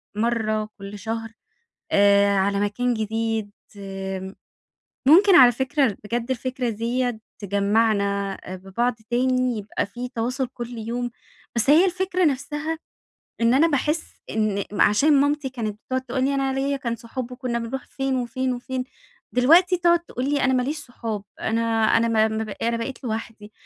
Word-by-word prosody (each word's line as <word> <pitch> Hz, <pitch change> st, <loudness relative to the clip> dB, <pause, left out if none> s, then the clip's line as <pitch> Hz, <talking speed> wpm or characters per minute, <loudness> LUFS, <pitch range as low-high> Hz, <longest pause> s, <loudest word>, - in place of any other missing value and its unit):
مرّة 215 Hz, -1 st, 0 dB
كل 200 Hz, 0 st, -8 dB
شهر 225 Hz, +2 st, -4 dB, 0.6 s
آآ 200 Hz, 0 st, +5 dB
على 200 Hz, +1 st, +1 dB
مكان 240 Hz, +4 st, 0 dB
جديد 220 Hz, -1 st, -2 dB, 0.3 s
آمم، 195 Hz, -1 st, -6 dB, 0.7 s
ممكن 380 Hz, +5 st, +7 dB
على 250 Hz, -2 st, +8 dB
فكرة 265 Hz, -2 st, +1 dB
بجدّ 235 Hz, +3 st, -3 dB
الفكرة 255 Hz, 0 st, -2 dB
ديّة 235 Hz, +2 st, -1 dB, 0.2 s
تجّمعنا 200 Hz, -1 st, +1 dB, 0.2 s
ببعض 195 Hz, +7 st, -1 dB, 0.2 s
تاني 255 Hz, -1 st, +1 dB
يبقى 205 Hz, -1 st, -3 dB
في 245 Hz, +5 st, -6 dB
تواصل 250 Hz, +2 st, -2 dB
كل 240 Hz, -1 st, -7 dB
يوم، 240 Hz, +2 st, -3 dB, 0.5 s
بس 235 Hz, +4 st, +2 dB
هي 325 Hz, +5 st, +7 dB
الفكرة 370 Hz, 0 st, 0 dB
نفسها 295 Hz, +3 st, -1 dB, 0.6 s
إن 230 Hz, +1 st, +4 dB
أنا 295 Hz, +6 st, +5 dB
باحس 300 Hz, +1 st, 0 dB, 0.3 s
إن 215 Hz, -2 st, 0 dB
عشان 210 Hz, +9 st, +4 dB
مامتي 290 Hz, -1 st, 0 dB
كانت 215 Hz, -5 st, -4 dB
تقعد 260 Hz, 0 st, 0 dB
تقول 260 Hz, 0 st, -2 dB
لي 280 Hz, -, +1 dB
أنا 270 Hz, -1 st, 0 dB
ليَّ 280 Hz, +1 st, 0 dB
كان 235 Hz, -3 st, -3 dB
صحاب 240 Hz, +2 st, -6 dB
و 250 Hz, -, -6 dB
كنّا 245 Hz, -2 st, -2 dB
بنروح 240 Hz, +3 st, -5 dB
فين 270 Hz, -1 st, -2 dB
وفين 255 Hz, +1 st, -1 dB
وفين، 255 Hz, +1 st, -4 dB, 0.5 s
دلوقتي 340 Hz, +9 st, +5 dB
تقعد 345 Hz, 0 st, +4 dB
تقول 260 Hz, -7 st, -5 dB
لي: 290 Hz, -1 st, +1 dB
"أنا 260 Hz, -, +3 dB
ما 255 Hz, -, +3 dB
ليش 290 Hz, +5 st, -2 dB
صحاب 230 Hz, -7 st, -5 dB, 0.2 s
أنا 225 Hz, +1 st, 0 dB, 0.4 s
أنا 230 Hz, -, +2 dB
ما 220 Hz, -1 st, +3 dB
ما 220 Hz, 0 st, -2 dB
ب 215 Hz, -, -8 dB
أنا 230 Hz, 0 st, -1 dB
بقيت 240 Hz, +4 st, -5 dB
لوحدي" 220 Hz, -2 st, -5 dB
240 Hz, 155 wpm, -23 LUFS, 215-265 Hz, 0.7 s, على